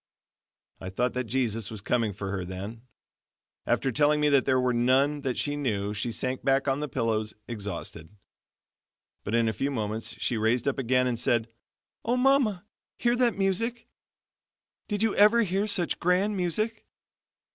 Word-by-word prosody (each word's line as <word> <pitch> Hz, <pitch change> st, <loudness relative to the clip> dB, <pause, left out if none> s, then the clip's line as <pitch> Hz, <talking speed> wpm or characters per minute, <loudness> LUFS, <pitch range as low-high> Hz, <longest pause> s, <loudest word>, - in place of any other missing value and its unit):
I 95 Hz, -, -6 dB
thought 120 Hz, +6 st, -1 dB
that 125 Hz, 0 st, -2 dB
Jesus 115 Hz, -3 st, -1 dB
was 110 Hz, -, -7 dB
coming 115 Hz, +2 st, 0 dB
for 100 Hz, 0 st, -5 dB
her 95 Hz, -2 st, -2 dB
then. 95 Hz, +5 st, -7 dB, 0.9 s
After 135 Hz, -, +1 dB
telling 150 Hz, +4 st, +3 dB
me 150 Hz, 0 st, +3 dB
that 140 Hz, -2 st, +4 dB
there 130 Hz, -1 st, +3 dB
were 125 Hz, -1 st, +1 dB
none 135 Hz, +5 st, +2 dB
that 130 Hz, -3 st, -2 dB
she 145 Hz, 0 st, -1 dB
knew 105 Hz, -8 st, -1 dB
she 105 Hz, +3 st, -2 dB
sank 130 Hz, +3 st, -3 dB
back 135 Hz, +1 st, +2 dB
on 135 Hz, +1 st, +1 dB
the 150 Hz, -, -2 dB
pillows 110 Hz, -3 st, -1 dB
exhausted. 100 Hz, -7 st, -6 dB, 1.1 s
But 105 Hz, -, -2 dB
in 115 Hz, -1 st, +3 dB
a 110 Hz, -, 0 dB
few 135 Hz, -, -1 dB
moments 110 Hz, -4 st, -3 dB
she 120 Hz, -, 0 dB
raised 115 Hz, +4 st, +1 dB
up 135 Hz, -, 0 dB
again 125 Hz, 0 st, +2 dB
and 120 Hz, -2 st, -1 dB
said: 115 Hz, -1 st, +1 dB, 0.5 s
"Oh, 240 Hz, +3 st, +1 dB
Mama, 250 Hz, -8 st, +2 dB, 0.3 s
hear 240 Hz, 0 st, +2 dB
that 245 Hz, -3 st, +2 dB
music! 230 Hz, +5 st, -1 dB, 1.0 s
Did 205 Hz, 0 st, -1 dB
you 225 Hz, -, +2 dB
ever 215 Hz, +3 st, +6 dB
hear 195 Hz, +1 st, 0 dB
such 185 Hz, -5 st, 0 dB
grand 185 Hz, +4 st, +2 dB
music? 210 Hz, +5 st, -1 dB
130 Hz, 170 wpm, -27 LUFS, 110-180 Hz, 1.1 s, ever